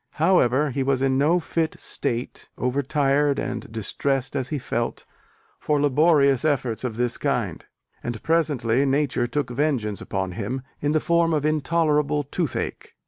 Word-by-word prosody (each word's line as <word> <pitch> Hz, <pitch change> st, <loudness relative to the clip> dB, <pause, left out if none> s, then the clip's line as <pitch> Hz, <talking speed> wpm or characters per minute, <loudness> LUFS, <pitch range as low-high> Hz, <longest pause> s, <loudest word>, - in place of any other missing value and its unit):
However, 150 Hz, -4 st, +3 dB
he 135 Hz, +2 st, -2 dB
was 135 Hz, 0 st, +1 dB
in 135 Hz, 0 st, +2 dB
no 160 Hz, +5 st, +3 dB
fit 165 Hz, -1 st, -2 dB
state, 120 Hz, -3 st, -3 dB
over 125 Hz, +3 st, 0 dB
tired 140 Hz, 0 st, +2 dB
and 120 Hz, -4 st, -4 dB
distressed 135 Hz, +5 st, -2 dB
as 130 Hz, -2 st, -1 dB
he 150 Hz, -, -1 dB
felt, 120 Hz, -3 st, -3 dB, 0.5 s
for 150 Hz, -1 st, +1 dB
laborious 145 Hz, -1 st, +4 dB
efforts 130 Hz, -7 st, 0 dB
of 115 Hz, -3 st, -3 dB
this 120 Hz, -1 st, 0 dB
kind: -, -, -1 dB, 0.4 s
and 120 Hz, -3 st, -5 dB
presently 140 Hz, -7 st, +2 dB
Nature 135 Hz, -3 st, +1 dB
took 130 Hz, 0 st, -2 dB
vengeance 120 Hz, -7 st, -1 dB
upon 95 Hz, -1 st, -3 dB
him 115 Hz, +8 st, -4 dB, 0.2 s
in 145 Hz, +1 st, +1 dB
the 155 Hz, -, +3 dB
form 170 Hz, 0 st, +2 dB
of 150 Hz, -1 st, -1 dB
intolerable 150 Hz, -1 st, +1 dB
toothache. 145 Hz, +1 st, -4 dB
140 Hz, 150 wpm, -24 LUFS, 125-150 Hz, 0.5 s, laborious